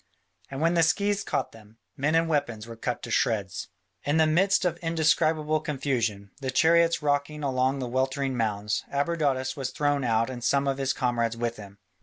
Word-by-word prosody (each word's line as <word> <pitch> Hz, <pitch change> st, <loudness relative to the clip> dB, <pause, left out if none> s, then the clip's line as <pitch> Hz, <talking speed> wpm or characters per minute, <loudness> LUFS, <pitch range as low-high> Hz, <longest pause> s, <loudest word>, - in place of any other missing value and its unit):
And 135 Hz, +1 st, -5 dB
where 165 Hz, +1 st, +3 dB
the 170 Hz, -1 st, +3 dB
scythes 200 Hz, +5 st, +1 dB
caught -, -, -2 dB
them, 110 Hz, 0 st, -17 dB, 0.2 s
men 145 Hz, +4 st, 0 dB
and 165 Hz, 0 st, +3 dB
weapons 140 Hz, -9 st, -1 dB
were 115 Hz, 0 st, -9 dB
cut 120 Hz, +2 st, -4 dB
to 120 Hz, -, -6 dB
shreds. 100 Hz, -5 st, 0 dB, 0.4 s
In 145 Hz, +2 st, +1 dB
the 160 Hz, -, +5 dB
midst 185 Hz, +5 st, +3 dB
of 180 Hz, -, 0 dB
indescribable 155 Hz, -1 st, +1 dB
confusion, 120 Hz, -9 st, -2 dB
the 130 Hz, -, -2 dB
chariots 165 Hz, +4 st, +3 dB
rocking 145 Hz, +1 st, 0 dB
among 130 Hz, 0 st, +1 dB
the 130 Hz, -2 st, -3 dB
weltering 130 Hz, +1 st, -1 dB
mounds, 105 Hz, -3 st, -1 dB
Abradatas 140 Hz, -3 st, 0 dB
was 135 Hz, -3 st, -3 dB
thrown 145 Hz, +1 st, 0 dB
out 115 Hz, -1 st, +2 dB
and 125 Hz, -2 st, -7 dB
some 140 Hz, +1 st, +2 dB
of 135 Hz, 0 st, -1 dB
his 135 Hz, -1 st, +1 dB
comrades 120 Hz, -3 st, -1 dB
with 120 Hz, 0 st, -2 dB
him. 100 Hz, -1 st, -11 dB
135 Hz, 185 wpm, -27 LUFS, 120-155 Hz, 0.4 s, the